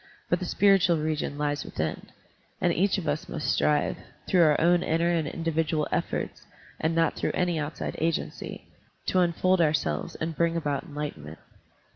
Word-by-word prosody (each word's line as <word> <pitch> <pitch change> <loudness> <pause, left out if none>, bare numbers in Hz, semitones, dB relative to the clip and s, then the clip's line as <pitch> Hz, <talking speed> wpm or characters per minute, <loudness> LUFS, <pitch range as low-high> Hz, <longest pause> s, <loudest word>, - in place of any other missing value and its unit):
But - - +3
the - - -3
spiritual 195 -4 +4
region 155 -2 -2
lies 145 0 -1
within, 80 0 -4 0.5
and 175 -2 +2
each 195 +3 +2
of 190 - -4
us 155 - -2
must 150 -3 -1
strive, 150 -1 +2 0.3
tlwough 180 - +4
our - - 0
own 175 +1 +4
inner 170 +1 +1
and 165 -3 0
individual 160 -1 -1
efforts - - -2 0.3
and 160 +1 0
not 165 0 +2
through - - -1
any 175 -3 +1
outside 150 +1 -4
agency, 165 0 -3 0.4
to 185 - +2
unfold 180 +1 +3
ourselves 150 - 0
and 160 0 -3
bring 170 +1 +1
about 145 -4 -2
enlightenment. 115 - -6
160 Hz, 160 wpm, -27 LUFS, 150-170 Hz, 0.5 s, spiritual